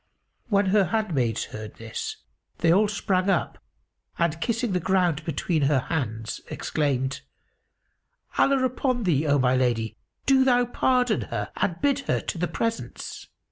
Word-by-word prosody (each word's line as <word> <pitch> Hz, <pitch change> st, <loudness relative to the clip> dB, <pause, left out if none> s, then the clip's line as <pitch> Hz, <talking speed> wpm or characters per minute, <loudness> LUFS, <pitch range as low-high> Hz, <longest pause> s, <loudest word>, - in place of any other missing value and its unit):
When 200 Hz, -2 st, +3 dB
her 205 Hz, -2 st, +5 dB
handmaids 170 Hz, -, 0 dB
heard 110 Hz, 0 st, -8 dB
this, 115 Hz, -1 st, -5 dB, 0.4 s
they 165 Hz, 0 st, +4 dB
all 210 Hz, +3 st, +4 dB
sprang 200 Hz, -2 st, 0 dB
up; 175 Hz, -5 st, 0 dB, 0.6 s
and, 165 Hz, -1 st, 0 dB
kissing 235 Hz, +1 st, 0 dB
the 180 Hz, -, +1 dB
ground 175 Hz, -4 st, +1 dB
between 160 Hz, +1 st, 0 dB
her 140 Hz, 0 st, +3 dB
hands, 115 Hz, -6 st, -3 dB
exclaimed, 135 Hz, -2 st, -1 dB, 1.1 s
"Allah 275 Hz, -1 st, +3 dB
upon 255 Hz, -1 st, 0 dB
thee, 160 Hz, -5 st, +2 dB
O 145 Hz, 0 st, +4 dB
my 130 Hz, -1 st, +3 dB
lady, 115 Hz, -3 st, 0 dB, 0.3 s
do 265 Hz, -1 st, +5 dB
thou 245 Hz, -2 st, +4 dB
pardon 250 Hz, -2 st, +2 dB
her -, -, -3 dB
and 180 Hz, -3 st, -1 dB
bid 285 Hz, -1 st, +2 dB
her -, -, +2 dB
to 170 Hz, -, -5 dB
the 175 Hz, -, +1 dB
presence!" 230 Hz, +4 st, -4 dB
175 Hz, 145 wpm, -25 LUFS, 135-225 Hz, 1.1 s, her